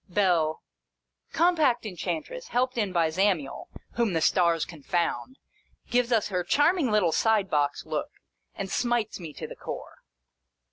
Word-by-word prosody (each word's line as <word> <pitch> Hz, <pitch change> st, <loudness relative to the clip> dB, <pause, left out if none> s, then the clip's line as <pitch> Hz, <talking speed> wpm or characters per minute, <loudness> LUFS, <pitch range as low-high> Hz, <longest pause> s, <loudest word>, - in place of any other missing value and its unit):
Bell. 175 Hz, -5 st, +1 dB, 0.7 s
Compact 320 Hz, -9 st, +3 dB
Enchantress, 315 Hz, -, -4 dB
helped 255 Hz, +1 st, 0 dB
in 210 Hz, -5 st, 0 dB
by 170 Hz, -3 st, +2 dB
Zamiel, 180 Hz, -5 st, 0 dB, 0.3 s
(whom 230 Hz, -5 st, +1 dB
the 165 Hz, -, +2 dB
stars 170 Hz, -1 st, +3 dB
confound 175 Hz, -, -2 dB, 0.3 s
!) -, -, -37 dB
gives 245 Hz, 0 st, +2 dB
us 215 Hz, -3 st, +2 dB
her 180 Hz, -2 st, -1 dB
charming 295 Hz, -, +3 dB
little 210 Hz, -6 st, +3 dB
side 215 Hz, 0 st, +2 dB
box 145 Hz, -1 st, 0 dB
look, -, -, -3 dB, 0.5 s
and 195 Hz, -1 st, -5 dB
smites 240 Hz, -3 st, 0 dB
me 165 Hz, -4 st, -7 dB
to -, -, -7 dB
the -, -, -8 dB
core. -, -, -8 dB
205 Hz, 145 wpm, -27 LUFS, 170-245 Hz, 0.7 s, Compact